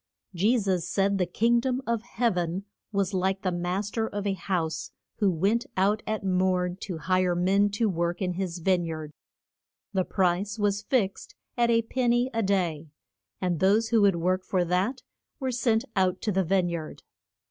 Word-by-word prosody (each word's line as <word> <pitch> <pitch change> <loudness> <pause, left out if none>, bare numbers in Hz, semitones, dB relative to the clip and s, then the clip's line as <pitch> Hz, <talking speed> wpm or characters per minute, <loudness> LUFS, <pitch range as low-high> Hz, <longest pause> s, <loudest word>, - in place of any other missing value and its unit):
Je 205 +8 +3
sus 190 -5 0
said 195 0 +1
the 180 - +1
king 230 +6 +2
dom 255 +1 -1
of 235 -2 0
heav 235 -2 0
en 175 +2 -2 0.3
was 200 -1 0
like 190 +1 0
the 185 - +1
mas 180 +4 -2
ter 225 -1 -1
of 205 -1 -4
a 200 - +1
house 165 -4 -2 0.3
who 205 - +3
went 200 - +1
out 205 +3 +2
at 215 -1 -2
morn 185 -1 +1
to 190 -3 -5
hire 185 +2 +1
men 195 +3 +3
to 210 +3 0
work 170 -2 -1
in 185 -3 -1
his 180 -1 -3
vine 180 +1 +2
yard. 155 -2 -5 0.8
The 190 -1 +2
price 190 +3 0
was 205 -1 +1
fixed 210 -3 -1 0.2
at 235 -1 +2
a 230 0 +3
pen 245 +1 0
ny 240 +2 +2
a 225 - +1
day, 175 -6 0 0.5
and 180 -4 -1
those 210 +4 +3
who 225 -2 +4
would 200 -3 +5
work 185 +2 0
for 185 -2 0
that 185 +9 0 0.4
were 260 -2 -1
sent 235 -2 +1
out 185 -1 +2
to 215 - +1
the 190 0 +2
vine 185 0 +1
yard. 165 -2 -6
190 Hz, 190 wpm, -27 LUFS, 180-215 Hz, 0.8 s, would